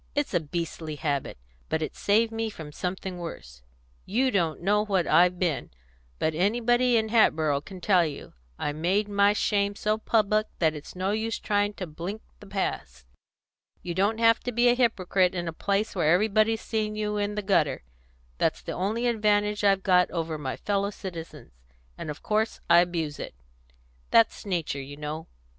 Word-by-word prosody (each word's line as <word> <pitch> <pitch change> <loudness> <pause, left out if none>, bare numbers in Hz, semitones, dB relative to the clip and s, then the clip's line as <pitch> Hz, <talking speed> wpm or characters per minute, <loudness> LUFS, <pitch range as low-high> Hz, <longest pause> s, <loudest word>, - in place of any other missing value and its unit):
It's 290 -5 -1
a 175 - +3
beastly 160 0 -5
habit. 145 - -2 0.3
But 160 0 0
it's - - -6
saved 225 +3 +3
me 225 0 -2
from 155 -7 -9
something 180 +2 -4
worse. 65 - -8 0.4
You 255 +6 +1
don't 165 - 0
know 205 +4 +2
what 195 -5 +1
I've 180 +1 +4
been; 175 -6 -1 0.5
but 160 - 0
anybody 240 +7 +2
in 220 -1 0
Hatboro' 155 -10 +3
can 185 +3 -11
tell 185 -3 +4
you. 150 -4 -6 0.2
I 150 - -2
made 185 +7 0
my 200 0 +3
shame 205 -1 0
so 215 +1 0
public 215 -1 +2
that 160 -3 +2
it's 150 +2 -10
no 185 +2 -1
use 220 +1 -1
trying 205 0 0
to 185 - -5
blink 175 +7 -6 0.2
the 205 - -13
past. 65 - -4 0.8
You 175 - -3
don't 200 +5 +1
have 230 0 +4
to 245 - -4
be 240 +1 +4
a - - +5
hypocrite 190 -6 +2
in 175 -1 -3
a 165 - -3
place 200 +5 -1
where 160 -4 +2
everybody's 215 +4 +3
seen 215 -1 -2
you 210 0 -2
in 205 0 -1
the 210 - -3
gutter; 160 - +1 0.6
that's - - 0
the - - -5
only 215 +6 -1
advantage 210 -2 +1
I've 195 -1 +3
got 180 -2 +4
over 165 -2 -3
my 130 -3 -3
fellow 200 -1 0
citizens, 165 - -8 0.4
and 155 - -7
of 150 - -7
course 215 +1 0
I 170 0 +7
abuse 165 -4 -1
it; - - -7 0.7
that's 230 -1 +3
nature, 165 -7 -2
you 140 +1 -9
know. 150 +2 -5
195 Hz, 180 wpm, -27 LUFS, 165-215 Hz, 0.8 s, I